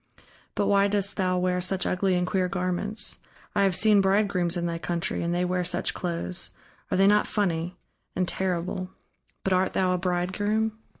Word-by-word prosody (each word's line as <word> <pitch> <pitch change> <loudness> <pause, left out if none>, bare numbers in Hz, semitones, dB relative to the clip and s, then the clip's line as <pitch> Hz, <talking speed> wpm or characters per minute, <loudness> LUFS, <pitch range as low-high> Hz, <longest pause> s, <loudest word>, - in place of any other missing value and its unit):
But 205 - +1
why 200 0 +4
dost 200 0 0
thou 185 -2 +1
wear 180 0 +1
such 185 +1 -1
ugly 185 0 +1
and 180 0 +1
queer 185 0 +1
garments? 195 +4 -2 0.3
I - - +2
have 195 -2 +3
seen 210 +1 +5
bridegrooms 190 -3 +1
in 175 - -1
thy 170 -1 -2
country, 170 0 -1
and 170 - -1
they 175 +1 +1
wear 180 0 0
such 175 0 -1
clothes 175 +1 -3 0.4
are - - 0
they 195 - +5
not 210 +1 +4
funny 180 -3 -1 0.4
and 185 - 0
terrible.... 185 0 -2 0.5
But 190 - +1
art 185 0 +2
thou 185 -1 +2
a 180 - 0
bridegroom?" 205 +5 0
185 Hz, 180 wpm, -26 LUFS, 180-200 Hz, 0.5 s, seen